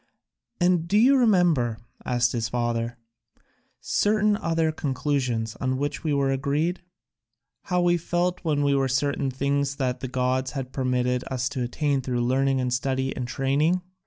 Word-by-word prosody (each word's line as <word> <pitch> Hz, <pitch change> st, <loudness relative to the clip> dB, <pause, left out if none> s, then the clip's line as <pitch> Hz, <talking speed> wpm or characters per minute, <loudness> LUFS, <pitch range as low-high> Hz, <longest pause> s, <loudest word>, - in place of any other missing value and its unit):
"And 175 Hz, -2 st, +2 dB
do 205 Hz, -, +2 dB
you 255 Hz, +6 st, +6 dB
remember," 175 Hz, -, +3 dB, 0.3 s
asked 120 Hz, -1 st, +1 dB
his 115 Hz, -2 st, -2 dB
father, 120 Hz, 0 st, -2 dB, 0.8 s
"certain 210 Hz, 0 st, +2 dB
other 165 Hz, -4 st, 0 dB
conclusions 130 Hz, -6 st, -2 dB
on 130 Hz, 0 st, 0 dB
which 145 Hz, +2 st, -3 dB
we 155 Hz, -, 0 dB
were 140 Hz, -1 st, +1 dB
agreed? 145 Hz, +6 st, -1 dB, 0.8 s
How 180 Hz, -1 st, +1 dB
we 175 Hz, 0 st, +3 dB
felt 175 Hz, +1 st, -1 dB
there 155 Hz, -3 st, +1 dB
were 140 Hz, -2 st, +2 dB
certain 140 Hz, +1 st, 0 dB
things 140 Hz, +1 st, -1 dB
that 130 Hz, -3 st, -2 dB
the 130 Hz, -, -4 dB
gods 130 Hz, +1 st, -1 dB
had 135 Hz, -2 st, -5 dB
permitted 125 Hz, -1 st, 0 dB
us 130 Hz, -1 st, -1 dB
to 140 Hz, -3 st, -4 dB
attain 140 Hz, +3 st, 0 dB
through 125 Hz, -1 st, -2 dB
learning 135 Hz, +1 st, +1 dB
and 125 Hz, -1 st, -1 dB
study 130 Hz, +1 st, -1 dB
and 125 Hz, -2 st, -4 dB
training? 145 Hz, +8 st, +1 dB
135 Hz, 155 wpm, -25 LUFS, 125-160 Hz, 0.8 s, you